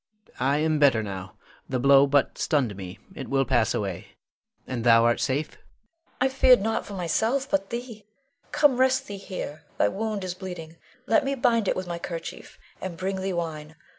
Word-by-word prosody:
I 135 +3 +2
am 155 0 +1
better 135 -7 +4
now. 95 -3 -7 0.3
The 130 - 0
blow 140 +2 +6
but 140 -1 +2
stunned 130 - +1
me, 95 -2 -8 0.2
it - - -7
will 135 0 +2
pass 115 -3 +2
away. 95 -4 -4 0.5
And 125 -3 -4
thou 115 -1 +6
art 120 0 +2
safe? 145 +3 0
Leonore. - - -21 0.6
I 260 - +5
feared 260 -1 +5
not 220 +3 -1
for 205 - -7
myself, 220 - 0
but 195 0 0
thee. 235 -3 -6 0.5
Come, 285 -4 +4
rest 260 0 +3
thee 200 - -7
here, 185 -6 -6 0.2
thy 100 - +3
wound 215 - -3
is 185 -1 -3
bleeding; 180 -3 -8 0.3
let 225 - +3
me 275 +1 -1
bind 235 -5 +2
it - - +2
with 185 - -3
my 170 -1 -5
kerchief, 170 -1 -7 0.2
and 185 -3 -5
bring 190 +1 -2
thee 190 0 -2
wine. 160 -3 -4
170 Hz, 190 wpm, -26 LUFS, 135-210 Hz, 0.6 s, blow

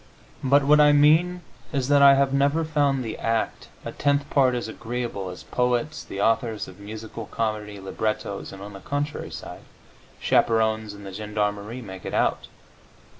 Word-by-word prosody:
But 140 +1 +4
what 150 +2 +5
I 150 0 +7
mean 160 +5 +4 0.3
is 135 -4 -1
that 145 -1 +5
I 140 0 +9
have 135 0 +2
never 140 +4 +2
found 145 -4 +1
the 110 - -5
act 115 0 -1 0.2
a - - -4
tenth 145 0 +1
part 130 -3 +4
as 120 - -3
agreeable 115 -4 -4
as 90 - -9
poets, 125 +4 -1
the 100 - -7
authors 115 0 +1
of 95 +1 -13
musical 110 +1 -8
comedy 105 -2 -3
librettos, 110 +1 -3
and 95 0 -9
(on 105 0 -9
the 100 - -9
contrary 145 +7 -3
side) - - -8 0.6
chaperones 110 -2 +2
and 100 0 -11
the 95 - -8
gendarmerie 105 +3 -3
make 95 -3 -9
it - - -4
out. - - +1
115 Hz, 170 wpm, -25 LUFS, 105-140 Hz, 0.6 s, I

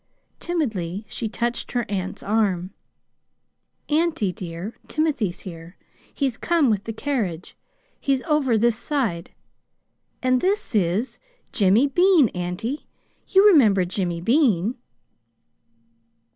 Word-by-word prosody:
Timidly 215 - -2
she 220 +2 -4
touched 235 +2 -3
her 240 -2 0
aunt's 190 -2 -4
arm. 195 -4 0 1.2
"Auntie, 310 - +1
dear, 180 +2 -6
Timothy's 275 - -1
here. 170 -1 -10 0.3
He's 265 -5 -1
come 330 -8 +2
with 205 -2 -1
the 225 - -3
carriage. 215 - -3 0.4
He's 270 -2 0
over 295 -7 +2
this 235 +1 +3
side. 220 - -2 0.9
And 255 0 +2
this 395 -4 0
is 200 +4 0 0.3
Jimmy 205 +4 +4
Bean, 340 - +4
auntie. 180 +10 -4 0.4
You 385 +1 +5
remember 220 - +6
Jimmy 175 -2 -3
Bean!" 230 - +2
225 Hz, 105 wpm, -23 LUFS, 185-280 Hz, 1.2 s, remember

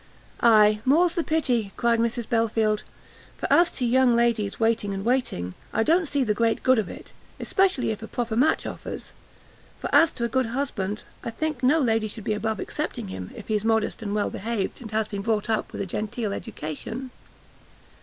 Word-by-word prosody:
"Ay, 215 -2 +6
more's 330 +7 +4
the 340 - 0
pity," 250 -11 0
cried 235 -1 +2
Mrs 235 0 -1
Belfield, 225 -2 +1 0.6
"for - - -4
as 345 0 +6
to 250 - -1
young 250 0 +4
ladies 235 -4 +1
waiting 225 -3 +1
and 195 +1 -5
waiting, 235 - 0 0.2
I 225 - +2
don't 330 +5 +3
see 285 -1 +1
the 215 -4 +1
great 225 +1 +1
good 255 -2 +5
of 205 - -2
it; - - -11 0.3
especially 375 -12 +2
if 220 - -5
a 225 - -6
proper 235 -2 -2
match 260 +7 +2
offers; - - -7 0.7
for - - -5
as 330 -1 +6
to 235 - -4
a - - +2
good 255 +1 0
husband, 225 -5 -3 0.2
I - - -3
think 305 +2 -3
no 265 +5 +4
lady 225 -5 +1
should 215 0 -7
be 215 - 0
above 220 0 -2
accepting - - -4
him, 95 -1 -6
if - - -10
he's 215 -2 0
modest 225 0 +1
and 205 -1 -3
well 210 - 0
behaved, 220 0 -3
and 225 - -7
has 215 0 0
been 200 -2 -4
brought 215 0 0
up 220 - -1
with - - -5
a - - -1
genteel 215 +2 -3
education." 220 - -6
225 Hz, 195 wpm, -25 LUFS, 210-255 Hz, 0.7 s, Ay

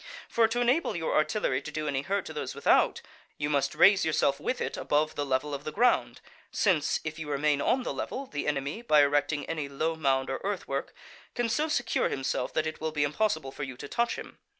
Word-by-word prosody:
For 230 -1 +3
to 235 +2 -2
enable 250 +7 +2
your 160 -2 -1
artillery 155 -4 +1
to 145 - -7
do 155 0 -3
any 135 -2 0
hurt 195 +6 -1
to 160 - -7
those 150 - -4
without, - - +3 0.3
you 145 0 -2
must 140 -1 +1
raise 195 -1 +6
yourself 145 -3 +1
with 255 - -2
it - - -2
above 155 +1 0
the 145 - -2
level 135 +2 0
of 140 0 -4
the 155 - -4
ground, 245 +7 +2 0.3
since, 180 -8 +1
if 155 +1 -5
you 155 -2 -6
remain 145 0 +1
on 255 - +2
the - - -3
level, 275 - -4
the 145 - -4
enemy, 145 +7 -2
by 150 -11 +5
erecting 145 0 +1
any 155 -4 -3
low 160 +4 -1
mound 135 -4 +1
or 135 - -3
earth 200 -1 -3
work, - - -3 0.4
can 240 -2 0
so 300 +7 +1
secure 245 -6 0
himself 130 -2 -2
that 155 - +1
it 155 0 -5
will 160 0 -1
be 150 -2 0
impossible 155 -2 0
for 145 - -9
you 130 -3 -5
to 145 - -7
touch 235 - 0
him. - - -10
155 Hz, 225 wpm, -28 LUFS, 145-200 Hz, 0.4 s, raise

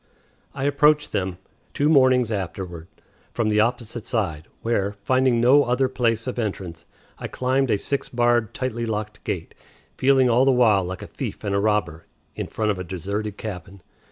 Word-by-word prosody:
I 135 - -4
approached 150 +1 +3
them, 95 -2 -2 0.4
two 145 - +2
mornings 130 -5 +4
afterward, 90 -4 -5 0.5
from 115 -2 +1
the 105 0 +2
opposite 120 0 -1
side, 85 -9 -2 0.2
where, 100 -3 0
finding 130 0 +2
no 130 +5 +6
other 125 +2 +2
place 115 -3 0
of 125 -1 -4
entrance, 90 -6 -4 0.3
I - - -4
climbed 130 +1 0
a 105 - +3
six 140 +7 -3
barred, 120 -2 +2
tightly 120 -3 -3
locked 105 -1 -4
gate - - -4 0.4
feeling 130 -1 +4
all 120 +2 +4
the 135 - +4
while 110 -6 +4
like 90 -1 -6
"a - - -6
thief - - -6
and 100 -2 -1
a 100 - +2
robber" 105 -6 -1 0.3
in - - -4
front 110 -1 -1
of 95 - -4
a - - -3
deserted 100 +4 -4
cabin. 95 -3 -8
110 Hz, 175 wpm, -23 LUFS, 100-130 Hz, 0.5 s, no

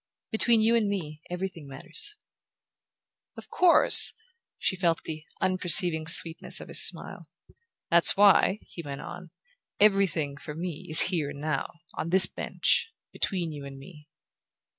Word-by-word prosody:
"Between 225 0 +1
you 230 +1 +1
and 220 -3 -1
me 155 -6 -7
everything 180 -4 -8
matters." 145 - -2 1.2
"Of - - -14
course!" 360 -2 +4 0.4
She 190 - -3
felt 170 -3 -3
the 155 -1 -10
unperceiving 175 -3 +1
sweetness 165 0 +4
of - - -13
his - - +5
smile. - - 0 0.6
"That's 170 +2 +3
why," 200 0 +2
he 170 - -12
went 140 -3 -10
on, 175 -1 -12 0.5
"'everything,' 190 -9 -1
for 150 0 -11
me, 175 +1 -9
is 155 - +7
here 155 -5 -4
and 145 -1 -11
now: 150 -1 -5 0.2
on 165 - -7
this 185 +1 +8
bench, 450 - -4 0.2
between 175 -4 -5
you 145 -2 -11
and 140 -1 -12
me." 150 +1 -17
170 Hz, 140 wpm, -24 LUFS, 150-190 Hz, 1.2 s, this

